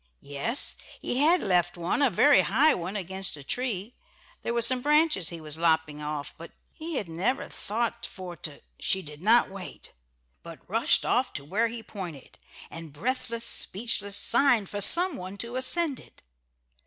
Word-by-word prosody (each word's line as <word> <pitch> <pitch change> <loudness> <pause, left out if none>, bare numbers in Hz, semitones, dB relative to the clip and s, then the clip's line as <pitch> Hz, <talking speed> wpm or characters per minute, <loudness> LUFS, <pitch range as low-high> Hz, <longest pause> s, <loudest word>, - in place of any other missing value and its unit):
Yes, 145 - -1 0.2
he 245 - -1
had 330 +5 +5
left 175 -3 +1
one 175 +11 -1
a 280 - +5
very 285 +9 +5
high 310 +3 +3
one 180 +3 -4
against 190 -3 -2
a 145 - -10
tree. 225 - -2 0.5
There - - -3
were 235 0 +1
some 250 +2 +2
branches 300 - +2
he 170 - -8
was 155 0 -6
lopping 160 -3 +1
off, 150 -1 -4
but 165 - -10 0.2
he 325 0 -6
had 205 - -2
"never 180 +11 -1
thought 235 +2 -3
for 185 -3 -8
to 150 -2 -6
" - - -43
She 190 0 +2
did 150 0 -11
not 225 +2 +4
wait, 195 -2 -10 0.5
but 165 -1 -12
rushed 225 +5 +2
off 250 +1 +1
to 140 - -5
where 210 +9 +1
he 230 0 -6
pointed, 175 - -9 0.3
and 165 -2 -8
breathless, 230 - -2
speechless, 200 -2 0
signed 240 -7 +3
for 205 - -3
some 350 - +4
one 185 +2 -8
to 235 +3 -5
ascend 280 +2 +2
it. - - -18
200 Hz, 175 wpm, -27 LUFS, 170-250 Hz, 0.5 s, had